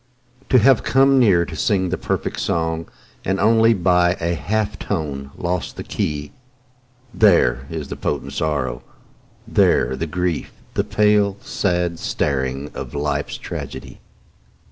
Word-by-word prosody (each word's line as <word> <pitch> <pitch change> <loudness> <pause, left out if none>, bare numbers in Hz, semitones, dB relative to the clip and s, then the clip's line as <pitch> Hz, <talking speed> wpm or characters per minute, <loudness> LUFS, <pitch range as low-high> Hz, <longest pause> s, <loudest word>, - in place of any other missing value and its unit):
To 130 - +5
have 125 +1 +5
come 135 0 +4
near 95 -8 +4
to 80 - -8
sing 95 +1 +1
the 90 - 0
perfect - - -3
song 80 -1 -1 0.3
And 95 +1 -1
only 115 +2 +4
by 90 -1 +3
a 85 +1 0
half 105 +2 -2
tone 70 -3 -3
lost 90 0 -3
the - - -6
key, 75 -1 -3 0.8
There 65 - +3
is 80 -4 -5
the - - -4
potent 70 -1 -3
sorrow, 70 -6 -1 0.7
there 65 +2 +3
the 80 +5 -3
grief, 90 -1 -2 0.2
The - - +1
pale, 105 -2 +2
sad 90 -3 -1
staring 70 0 -2
of - - -7
life's 75 0 -2
tragedy. - - -7
85 Hz, 135 wpm, -21 LUFS, 75-100 Hz, 0.8 s, To